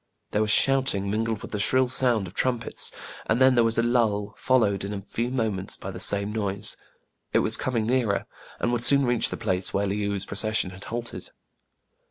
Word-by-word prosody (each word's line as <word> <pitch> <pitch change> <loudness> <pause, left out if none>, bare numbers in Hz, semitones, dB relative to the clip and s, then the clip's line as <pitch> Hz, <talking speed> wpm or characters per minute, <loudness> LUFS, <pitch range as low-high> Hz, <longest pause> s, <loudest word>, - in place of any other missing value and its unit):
There 105 - 0
was 110 - -1
shouting 120 -6 +2
mingled 110 0 -2
with - - -9
the 105 - -3
shrill 130 +4 +2
sound 125 -4 +3
of 90 - -11
trumpets; 120 0 -1 0.4
and 110 - +1
then 130 0 +5
there 120 -1 +3
was 115 0 0
a 115 - +2
lull, 110 -4 0
followed 110 -7 +1
in 100 +1 -5
a 100 - -6
few 115 +4 -4
moments 110 -7 -2
by - - -8
the - - -9
same 100 +1 +3
noise. 100 -1 -2 0.6
It - - +3
was - - +5
coming 115 -4 -2
nearer, 120 -4 0 0.3
and 120 - -1
would 120 -1 -1
soon 140 +1 +7
reach 120 -1 +1
the - - -5
place 90 0 -1
where 100 +1 0
Le 100 - -2
ou*s 100 -1 -2
procession 110 -2 0
had 95 +1 -10
halted. 120 0 -6
110 Hz, 205 wpm, -24 LUFS, 100-120 Hz, 0.6 s, soon